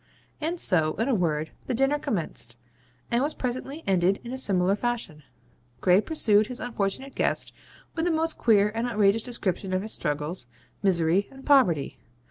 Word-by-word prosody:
And 335 Hz, +3 st, -2 dB
so, 160 Hz, -, +2 dB
in 225 Hz, -, -1 dB
a 275 Hz, -, +2 dB
word, 160 Hz, -6 st, 0 dB, 0.2 s
the 250 Hz, -, -1 dB
dinner 270 Hz, +4 st, +2 dB
commenced, 155 Hz, -, -4 dB, 0.6 s
and 235 Hz, +1 st, +2 dB
was 295 Hz, +3 st, 0 dB
presently 265 Hz, +5 st, -4 dB
ended 190 Hz, 0 st, +2 dB
in 240 Hz, -, -7 dB
a 260 Hz, -, -4 dB
similar 190 Hz, -4 st, +2 dB
fashion. 225 Hz, -9 st, -3 dB, 0.6 s
Gray 185 Hz, +2 st, +4 dB
pursued 215 Hz, -8 st, +3 dB
his 250 Hz, 0 st, -4 dB
unfortunate 245 Hz, +3 st, -2 dB
guest -, -, 0 dB, 0.4 s
with 325 Hz, 0 st, -1 dB
the 350 Hz, -, +2 dB
most 325 Hz, +1 st, +1 dB
queer 210 Hz, -3 st, +4 dB
and 230 Hz, +2 st, -1 dB
outrageous 210 Hz, -1 st, +2 dB
description 195 Hz, -6 st, -2 dB
of 185 Hz, +1 st, 0 dB
his 215 Hz, -, -1 dB
struggles, 150 Hz, -1 st, -2 dB, 0.3 s
misery, 180 Hz, 0 st, +2 dB
and 270 Hz, 0 st, -13 dB
poverty. 200 Hz, -, +3 dB
210 Hz, 165 wpm, -26 LUFS, 180-255 Hz, 0.6 s, Gray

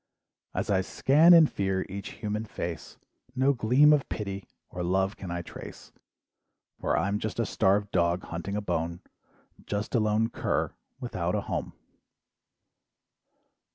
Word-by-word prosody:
"As -, -, -1 dB
I 95 Hz, -1 st, +3 dB
scan 150 Hz, -, +4 dB
in 165 Hz, -2 st, +9 dB
fear, 95 Hz, -7 st, -1 dB
each 100 Hz, 0 st, -7 dB
human 105 Hz, +1 st, -1 dB
face, 85 Hz, -6 st, -6 dB, 0.4 s
"No 135 Hz, +2 st, +3 dB
gleam 130 Hz, +5 st, +5 dB
of 145 Hz, -2 st, +1 dB
pity 100 Hz, -2 st, -5 dB, 0.2 s
or 90 Hz, -, -5 dB
love 95 Hz, +3 st, +1 dB
can 95 Hz, -, -8 dB
I 85 Hz, 0 st, -3 dB
trace, -, -, -10 dB, 0.9 s
"For -, -, 0 dB
I'm 100 Hz, +2 st, 0 dB
just 110 Hz, +2 st, -4 dB
a 115 Hz, -, +2 dB
starved 100 Hz, 0 st, +1 dB
dog 85 Hz, 0 st, +1 dB
hunting 85 Hz, +4 st, -5 dB
a 105 Hz, -, -1 dB
bone, 85 Hz, -2 st, -2 dB, 0.7 s
"Just 105 Hz, +1 st, -3 dB
a 120 Hz, -, +3 dB
lone 110 Hz, +1 st, +1 dB
"cur" -, -, -1 dB, 0.3 s
without -, -, -2 dB
a -, -, 0 dB
home. -, -, -4 dB
100 Hz, 145 wpm, -28 LUFS, 95-110 Hz, 0.9 s, in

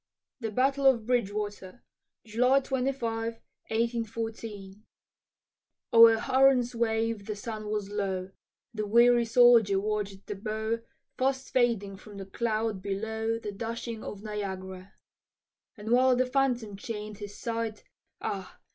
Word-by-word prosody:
THE 225 Hz, -3 st, -3 dB
BATTLE 270 Hz, +5 st, +2 dB
OF 235 Hz, -5 st, +4 dB
BRIDGEWATER 210 Hz, -3 st, -2 dB, 0.4 s
[July 250 Hz, +5 st, +3 dB
25, 245 Hz, -4 st, -2 dB, 0.4 s
1814] 225 Hz, -3 st, -3 dB, 1.1 s
O'er 230 Hz, -1 st, +8 dB
Huron's 260 Hz, -1 st, +3 dB
wave 225 Hz, -2 st, -1 dB
the 215 Hz, -, -3 dB
sun 215 Hz, 0 st, -6 dB
was 210 Hz, -2 st, -3 dB
low, 195 Hz, -2 st, -2 dB, 0.4 s
The 215 Hz, -2 st, -3 dB
weary 235 Hz, +2 st, +5 dB
soldier 230 Hz, -4 st, +5 dB
watch'd 205 Hz, -1 st, -3 dB
the -, -, -4 dB
bow 220 Hz, +2 st, -2 dB, 0.4 s
Fast 265 Hz, 0 st, 0 dB
fading 225 Hz, -6 st, +1 dB
from 205 Hz, +1 st, -12 dB
the 195 Hz, -, -6 dB
cloud 220 Hz, 0 st, -2 dB
below 220 Hz, +3 st, -2 dB
The 215 Hz, -2 st, -5 dB
dashing 230 Hz, +2 st, -5 dB
of 205 Hz, 0 st, -7 dB
Niagara. 190 Hz, -3 st, -6 dB, 0.8 s
And 215 Hz, +2 st, -5 dB
while 255 Hz, +1 st, +5 dB
the 255 Hz, +1 st, +2 dB
phantom 250 Hz, -6 st, 0 dB
chain'd 210 Hz, -1 st, -6 dB
his 205 Hz, -1 st, -8 dB
sight, 230 Hz, -2 st, -3 dB, 0.4 s
Ah! 190 Hz, -2 st, -5 dB
220 Hz, 120 wpm, -29 LUFS, 205-235 Hz, 1.1 s, O'er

